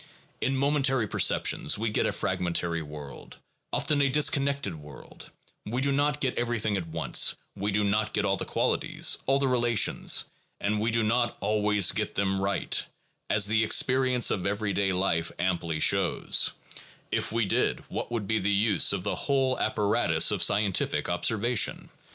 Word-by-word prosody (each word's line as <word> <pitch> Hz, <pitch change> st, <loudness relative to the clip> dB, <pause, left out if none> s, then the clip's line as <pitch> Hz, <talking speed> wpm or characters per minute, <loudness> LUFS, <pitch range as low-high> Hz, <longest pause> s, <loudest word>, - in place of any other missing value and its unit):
In 135 Hz, 0 st, 0 dB
momentary 135 Hz, -4 st, +1 dB
perceptions 100 Hz, -2 st, +1 dB
we 110 Hz, +1 st, -2 dB
get -, -, +1 dB
a -, -, 0 dB
fragmentary 85 Hz, -1 st, -1 dB
world, 75 Hz, -2 st, -10 dB, 0.3 s
often 145 Hz, -2 st, +1 dB
a 140 Hz, -, +3 dB
disconnected 140 Hz, -, +1 dB
world; 75 Hz, -3 st, -12 dB, 0.3 s
we 120 Hz, +4 st, -3 dB
do 140 Hz, +1 st, +1 dB
not 145 Hz, +1 st, 0 dB
get 135 Hz, -3 st, -2 dB
everything 115 Hz, -3 st, -1 dB
at 90 Hz, -4 st, -3 dB
once, 80 Hz, 0 st, +1 dB, 0.2 s
we 100 Hz, +1 st, -2 dB
do 105 Hz, +1 st, +1 dB
not 105 Hz, +2 st, 0 dB
get -, -, -1 dB
all -, -, +1 dB
the -, -, -3 dB
qualities, -, -, 0 dB
all 135 Hz, +1 st, +3 dB
the 140 Hz, -1 st, 0 dB
relations, 120 Hz, -3 st, +1 dB, 0.4 s
and 105 Hz, +1 st, -1 dB
we 110 Hz, +2 st, 0 dB
do 115 Hz, 0 st, +1 dB
not 120 Hz, +2 st, 0 dB
always 105 Hz, -2 st, +1 dB
get -, -, -4 dB
them 95 Hz, -1 st, 0 dB
right, 100 Hz, 0 st, 0 dB, 0.5 s
as 100 Hz, -1 st, +3 dB
the 110 Hz, +2 st, +2 dB
experience 125 Hz, +2 st, +2 dB
of 95 Hz, -, -2 dB
everyday 100 Hz, -1 st, -1 dB
life 90 Hz, -3 st, 0 dB
amply 85 Hz, -3 st, -2 dB
shows: -, -, +2 dB, 0.6 s
if -, -, -1 dB
we 115 Hz, 0 st, 0 dB
did, -, -, 0 dB
what -, -, -5 dB
would 115 Hz, -4 st, -3 dB
be 110 Hz, +2 st, 0 dB
the 100 Hz, -, -1 dB
use 100 Hz, -2 st, +3 dB
of 95 Hz, -2 st, -3 dB
the 105 Hz, -, -1 dB
whole 135 Hz, -2 st, 0 dB
apparatus 105 Hz, -1 st, +1 dB
of -, -, -2 dB
scientific 100 Hz, -2 st, +1 dB
observation? 110 Hz, +6 st, 0 dB
105 Hz, 165 wpm, -27 LUFS, 95-125 Hz, 0.6 s, a